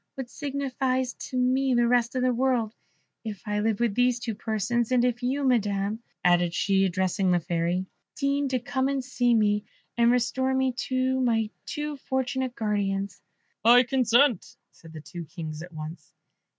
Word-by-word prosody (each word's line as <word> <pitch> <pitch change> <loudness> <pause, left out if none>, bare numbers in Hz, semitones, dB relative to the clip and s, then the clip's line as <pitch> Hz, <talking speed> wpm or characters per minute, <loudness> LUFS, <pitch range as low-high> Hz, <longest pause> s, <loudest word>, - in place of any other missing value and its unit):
What 265 -2 -6
signifies 265 -2 -2 0.2
to 255 - -3
me 255 +1 +2
the 240 0 +3
rest 240 0 +2
of 255 - 0
the 255 -1 +2
world 240 -3 +1 0.5
if 210 -4 -6
I 210 -1 -1
live 215 -1 0
with 235 -3 +1
these 245 +2 +2
two 235 -2 -3
persons; 220 +3 -1
and 250 -1 +3
if 245 0 -1
you, 265 +3 -1
Madam," 210 -4 +1 0.2
added 175 -1 +3
she, 195 -1 +2
addressing 185 +1 0
the 175 -1 +3
Fairy, 175 +2 -1 0.3
"deign 280 0 0
to 260 -1 0
come 260 +2 -1
and 275 -1 -1
see 245 -2 +1
me, 210 -1 +2 0.3
and 235 0 +4
restore 260 +2 +1
to - - +1
me 260 0 0
my 225 -3 +1 0.2
two 300 -1 -3
unfortunate 260 -2 -2
guardians?" 200 -2 -2 0.4
"I 240 +3 +7
consent," 245 -2 +2 0.2
said 165 - -16
the 155 -1 -9
two 170 +2 -8
Kings 155 -2 -7
at 175 +2 -9
once. 155 0 -8
240 Hz, 170 wpm, -26 LUFS, 200-260 Hz, 0.5 s, I